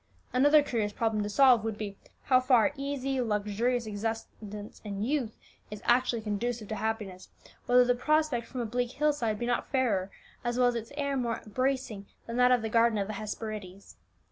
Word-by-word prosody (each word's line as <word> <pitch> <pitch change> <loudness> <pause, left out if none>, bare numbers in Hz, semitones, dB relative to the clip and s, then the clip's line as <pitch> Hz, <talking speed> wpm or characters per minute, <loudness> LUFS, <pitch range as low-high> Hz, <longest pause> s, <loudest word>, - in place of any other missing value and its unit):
Another 290 +4 +5
curious 220 -7 -1
problem 220 0 0
to 205 - -2
solve 250 -1 +5
would 220 -2 -3
be, 205 -2 -5 0.3
how 255 -1 +4
far 255 +1 +3
easy, 275 -1 -2
luxurious 225 +2 0
existence 210 -1 -6
in 200 -1 -4
youth 250 -3 -1 0.3
is 210 -1 -8
actually 240 -2 +2
conducive 215 +1 -2
to 220 - -2
happiness; 215 -4 -4 0.4
whether 245 0 +6
the 245 - +3
prospect 300 -2 +1
from 255 - -5
a - - -2
bleak 245 +2 -2
hill 300 +1 +2
side 230 -7 -1
be 240 - -3
not 245 0 -1
fairer, 215 -8 +1 0.3
as 240 0 -1
well 250 -1 +4
as - - -1
its 230 +1 -5
air 280 -1 -1
more 240 -3 -2
bracing, 255 -3 -2 0.2
than 230 +1 -5
that 250 0 +5
of 245 -3 +3
the - - -1
garden 230 0 +3
of 200 - 0
the 215 - -5
Hesperides. 210 -2 -7
235 Hz, 190 wpm, -29 LUFS, 215-255 Hz, 0.4 s, whether